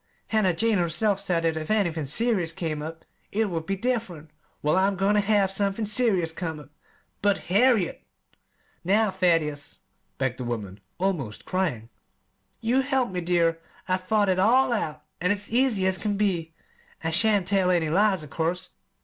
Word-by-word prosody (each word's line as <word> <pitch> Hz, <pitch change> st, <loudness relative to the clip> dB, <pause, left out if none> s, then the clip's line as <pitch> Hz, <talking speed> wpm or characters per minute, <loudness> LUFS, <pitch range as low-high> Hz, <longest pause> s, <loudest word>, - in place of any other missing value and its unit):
Hannah 205 Hz, -6 st, +2 dB
Jane 220 Hz, +1 st, +1 dB
herself 180 Hz, +4 st, +1 dB
said 180 Hz, -4 st, -1 dB
that 165 Hz, -1 st, +1 dB
if 155 Hz, -1 st, -5 dB
anythin' 170 Hz, -9 st, 0 dB
'serious' 195 Hz, -, +1 dB
came 155 Hz, -3 st, -4 dB
up 160 Hz, +2 st, -8 dB, 0.3 s
it 215 Hz, -1 st, 0 dB
would 165 Hz, -1 st, -4 dB
be 195 Hz, -, 0 dB
diff'rent. 190 Hz, -10 st, -3 dB, 0.3 s
Well, 150 Hz, +2 st, +2 dB
I'm 195 Hz, +1 st, +2 dB
goin' 195 Hz, +2 st, +2 dB
ter 210 Hz, -, +4 dB
have 200 Hz, -2 st, +2 dB
somethin' 200 Hz, +2 st, -1 dB
'serious' 210 Hz, -7 st, +1 dB
come 160 Hz, -2 st, -5 dB
up!" 145 Hz, -1 st, -14 dB, 0.5 s
"But, 205 Hz, -1 st, +3 dB, 0.2 s
Harriet 220 Hz, -4 st, +3 dB, 0.5 s
" -, -, -40 dB
"Now, 215 Hz, -1 st, +3 dB
Thaddeus," 165 Hz, -6 st, 0 dB, 0.4 s
begged 130 Hz, -1 st, -2 dB
the -, -, -3 dB
woman, 105 Hz, -5 st, -5 dB, 0.2 s
almost 170 Hz, -, -2 dB
crying, 150 Hz, -, -2 dB, 0.7 s
"you 235 Hz, +3 st, +1 dB
must 265 Hz, 0 st, +1 dB
help 265 Hz, -6 st, +1 dB
me, 180 Hz, -1 st, -3 dB
dear. 170 Hz, -1 st, +1 dB, 0.3 s
I've 185 Hz, 0 st, -1 dB
thought 210 Hz, +1 st, +2 dB
it 185 Hz, 0 st, +2 dB
all 245 Hz, +5 st, +4 dB
out, 155 Hz, -9 st, -3 dB, 0.2 s
an' 180 Hz, -, +1 dB
it's 205 Hz, +1 st, -1 dB
easy 240 Hz, -6 st, +3 dB
as 190 Hz, -1 st, +1 dB
can 205 Hz, +1 st, -1 dB
be. 170 Hz, -6 st, -1 dB, 0.5 s
I 165 Hz, -, -1 dB
shan't 205 Hz, +2 st, +4 dB
tell 195 Hz, -1 st, +2 dB
any 165 Hz, -4 st, +1 dB
lies, 195 Hz, -1 st, +2 dB
of 150 Hz, -, -12 dB
course. 170 Hz, +2 st, -2 dB
185 Hz, 175 wpm, -25 LUFS, 165-210 Hz, 0.7 s, ter